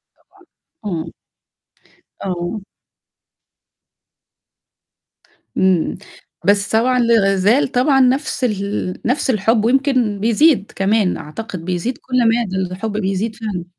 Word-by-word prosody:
طبعًا، - - -37 0.6
امم. 160 0 -5 1.1
آه. 180 +2 -3 3.0
امم. 185 -3 +2 0.5
بس 200 -1 +3
طبعًا 250 +3 +2
لازال 220 +1 +3
طبعًا 270 +2 +3
نفس 265 +2 +1
ال 200 -4 -2
نفس 260 +3 0
الحب، 220 -1 +2
ويمكن 255 -4 +1
بيزيد 230 +2 +3
كمان 195 0 +1
أعتقد، 175 +1 -7
بيزيد 185 +8 -2
كل 255 -1 -3 0.2
مادة، 205 -6 -2 0.2
الحب 215 +3 -4
بيزيد 210 +2 -2
فعلًا. 210 -7 -5
215 Hz, 95 wpm, -18 LUFS, 190-245 Hz, 3.0 s, بس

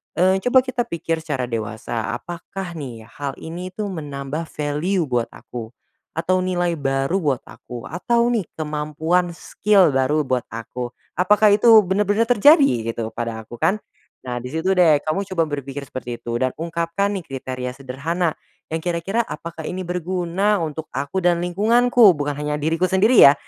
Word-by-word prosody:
eee, 185 +2 +3
coba 255 +1 +5
kita 250 -2 -2
pikir 165 -1 -2
secara 150 -5 -3
dewasa, 115 -1 -3
apakah 175 +5 -7
nih 120 -6 -7 0.2
hal 140 -2 -3
ini 175 +3 -7
tuh 210 -2 -3
menambah 150 -1 -5
value 155 +6 -1
buat 120 -5 0
aku? 115 0 -9 0.4
Atau 180 +3 +1
nilai 175 -2 0
baru 135 +5 0
buat 145 -8 0
aku, 120 -2 -9
atau 235 - +1
nih 220 -7 0
kemampuan 155 +3 -1
skill 200 -3 +3
baru 135 +3 +2
buat 130 -3 -1
aku. 120 +2 -6 0.2
Apakah 210 +4 +5
itu 210 +3 +4
benar-benar 205 +3 +1
terjadi 240 - +5
gitu 115 -1 -3
pada 115 -1 -4
aku, 115 +2 -11
kan? 210 - +1 0.4
Nah 125 -1 -4
di 125 - -5
situ 160 +4 0
deh 160 -5 +5
kamu 190 +6 -1
coba 165 - +2
berpikir 140 -1 -5
seperti 120 -2 -6
itu, 120 0 -2
dan 130 +1 0
ungkapkan 170 +4 -1
nih 180 - -7
kriteria 130 -1 -5
sederhana, 145 +6 -2 0.3
yang 160 - -1
kira-kira 180 +7 -1
apakah 160 0 -7
ini 185 +3 -4
berguna 180 +2 0
untuk 160 0 -4
aku 140 +7 -3
dan 175 -1 +2
lingkunganku, 220 +4 +5
bukan 145 -1 -2
hanya 150 0 -2
diriku 165 +4 +1
sendiri 200 +6 +3
ya, 140 - +9
165 Hz, 160 wpm, -22 LUFS, 135-185 Hz, 0.4 s, ya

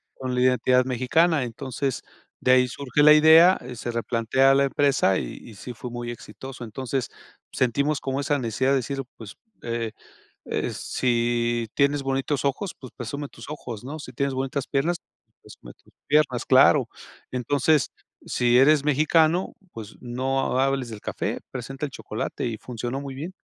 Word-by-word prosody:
con 130 -1 -4
la 125 - +1
identidad 125 0 +3
mexicana, 135 +5 +2
entonces, 130 +2 -3 0.4
de 130 - +2
ahí 125 0 +5
surge 140 +3 0
la 150 0 +9
idea, 160 +4 +7
eh, 125 0 -8
se 120 +1 -4
replantea 120 +3 +2
a - - +4
la 140 - +4
empresa, 135 -8 +2
y - - -6
y 115 - -12
sí 120 +5 -8
fue 125 +1 -8
muy 120 0 -5
exitoso, 125 +3 -9
entonces, 130 +3 -3 0.4
sentimos 140 +4 +1
como 135 0 -2
esa 145 +1 0
necesidad 130 +2 0
de 140 - +4
decir: 135 +2 -3 0.2
"Pues, 110 -3 -10 0.3
eh 115 -1 -3 0.6
eh, - - -1
si 120 -1 0
tienes 140 0 +2
bonitos 135 +1 -1
ojos, 170 +7 -1
pues, 130 - -11
presume 140 +5 -5
tus - - -12
ojos, 120 -7 -7
¿no?, 145 +5 -6
si 130 -3 -9
tienes 140 +2 -1
bonitas 135 +1 -2
piernas, 160 +6 0 0.4
presume - - -13
tus - - -27 0.2
piernas". 145 -5 +2
Claro, 135 0 +6 0.4
entonces: 135 +3 +1 0.4
"Si 120 0 +2
eres 145 +1 +5
mexicano, 155 +4 +2 0.2
pues, 110 -2 -9
no 130 +1 -1
hables 135 -2 0
del 110 -2 -8
café, - - -3
presenta 135 +3 -5
el 145 - -7
chocolate", - - -5
y 115 -2 -3
funcionó 120 +3 -5
muy 135 -1 -7
bien. 160 +7 -6
130 Hz, 165 wpm, -24 LUFS, 120-140 Hz, 0.6 s, la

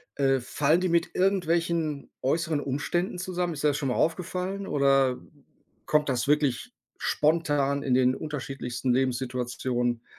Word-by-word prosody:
äh, 135 -1 +2
fallen 150 +7 +1
die 185 - +1
mit 170 0 +1
irgendwelchen 170 -5 0
äußeren 160 +2 0
Umständen 160 +7 -2
zusammen? 180 -1 -2
Ist 145 - -6
dir 150 - +5
das 145 - 0
schon 140 - -2
mal - - 0
aufgefallen, 185 +3 -1
oder 135 -2 +3 0.7
kommt 150 -1 +2
das 125 +1 0
wirklich 145 -4 +1 0.2
spontan 145 -3 +1
in 130 -3 0
den 130 0 +4
unterschiedlichsten 135 -4 -3
Lebenssituationen 125 -1 -1
145 Hz, 135 wpm, -27 LUFS, 130-170 Hz, 0.7 s, dir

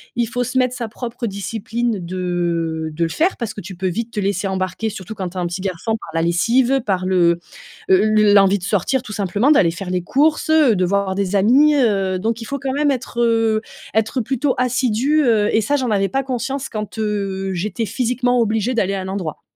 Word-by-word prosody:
Il 235 -1 0
faut 245 +1 -1
se 255 +2 -3
mettre 255 -1 +2
sa 235 -2 -4
propre 235 +1 -5
discipline 225 +2 -3
de 170 -3 -2
de 170 +2 -1
le 165 - 0
faire 340 - +1
parce 225 -3 -4
que 215 - -8
tu 190 +1 -9
peux 185 +1 -2
vite 230 +6 -3
te 210 - -3
laisser 195 0 -1
embarquer, 190 +3 -2
surtout 195 0 -7
quand 190 -4 -4
tu 185 - -11
as - - -1
un 175 - -1
petit 175 +2 -4
garçon, 195 +4 -2
par - - -11
la 165 - +1
lessive, 235 +11 +2
par 185 -3 0
le, 175 -2 +3 0.5
heu, 190 0 +6 0.2
l 210 -1 +5
l'envie 200 0 +5
de - - -14
sortir 220 +7 0
tout 210 - -9
simplement, 205 - +1
d'aller 180 - +4
faire 180 +2 -6
les 180 0 0
courses, 300 - +1
heu, 305 -8 +5
de 180 - +2
voir 200 +1 0
des 200 0 -1
amis. 265 +10 +5
Heu, 195 -8 +1
donc 225 +4 -1
il - - -6
faut 280 +5 -4
quand 270 -1 -2
même 290 +1 +2
être, 255 -2 -4
heu, 225 -2 +2 0.3
être 220 +4 +1
plutôt 265 +3 -1
assidue, 255 +4 +1
heu, 215 -4 +3
et 220 - +4
ça, 255 +8 0
j'en 255 -5 -1
avais 195 -1 +2
pas 270 0 -1
conscience 265 +1 -3
quand, 215 -1 -6
heu, 195 -3 -2
j'étais 205 +5 -2
physiquement 245 +3 0
obligée 225 +1 +1
d'aller 200 -5 0
à 195 - -2
un 185 - -6
endroit. 185 -6 -4
215 Hz, 225 wpm, -19 LUFS, 190-245 Hz, 0.5 s, heu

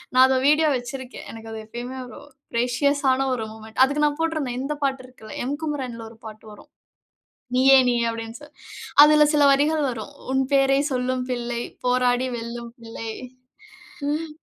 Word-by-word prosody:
நான் 255 0 +8
அத 260 -1 +2
வீடியோ 305 +2 +4
வச்சிருக்கேன். 255 +1 -8
எனக்கு 225 0 -10
அது 220 - -6
எப்பயுமே 245 +3 -7
ஒரு 250 - -11 0.3
ப்ரேஷியஸ் 250 +5 +1
ஆன 265 +1 +1
ஒரு 220 -2 -4
மொமென்ட் 220 +3 -5
அதுக்கு 285 +3 +1
நான் 295 0 0
போட்டிருந்தேன் 310 -7 -1
இந்த 275 +3 -2
பாட்டு 270 -1 0
இருக்குல்ல, 250 -4 -13
எம் 285 +2 -2
குமரன் 265 -6 -3
ல - - -7
ஒரு 225 - -16
பாட்டு 215 0 -10
வரும். 210 - -15 0.9
நீயே! 265 +1 +6
நீயே! 240 -1 +1
அப்பிடின்னு 225 0 -7
சொல்லி, 295 0 -15 0.5
அதில 300 0 +7
சில 295 -1 +5
வரிகள் 300 +3 +2
வரும். 235 +3 -7 0.2
உன் 265 0 +2
பேரைச் 275 +2 +3
சொல்லும் 255 0 -1
பிள்ளை, 240 -1 -3 0.2
போராடி 250 0 +2
வெல்லும் 235 0 -7
பிள்ளை 225 -1 -7 1.0
ம் 310 +2 -2
255 Hz, 165 wpm, -23 LUFS, 235-285 Hz, 1.0 s, நான்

